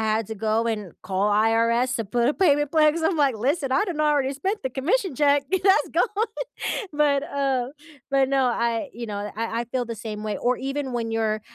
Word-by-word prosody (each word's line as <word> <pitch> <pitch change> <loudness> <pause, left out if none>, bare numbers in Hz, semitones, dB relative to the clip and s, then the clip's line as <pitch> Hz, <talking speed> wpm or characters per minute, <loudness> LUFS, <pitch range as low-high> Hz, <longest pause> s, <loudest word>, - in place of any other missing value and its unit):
had 220 -1 0
to 220 - -4
go 220 +2 0
and 210 -6 -3
call 195 +2 0
IRS 230 +4 +2
to 225 - -2
put 235 +5 +1
a 295 - +1
payment 295 -6 +2
plan 305 -2 +5
'cause 330 0 -4
I'm, 330 +1 +1
like, 275 -6 +2
"Listen, 270 +4 0
I 405 +10 +2
done 345 -6 -3
already 290 -3 +2
spent 385 +9 -3
the 260 - -1
commission 350 - 0
check, 285 0 +3
that's 380 +1 +3
gone," 430 0 +1 0.7
but, 290 -2 +2
uh 270 -3 -1 0.4
but, 270 -1 +3
no, 270 -2 +2
I 235 +1 0
you 235 0 -6
know, 205 0 -4
I 230 0 -2
I 240 - -2
feel 245 +1 -2
the 230 - -5
same 215 -1 -6
way, 210 -1 -2
or 250 +1 +1
even 275 0 -3
when 230 -1 -2
you're 215 -1 0
255 Hz, 215 wpm, -24 LUFS, 225-290 Hz, 0.7 s, plan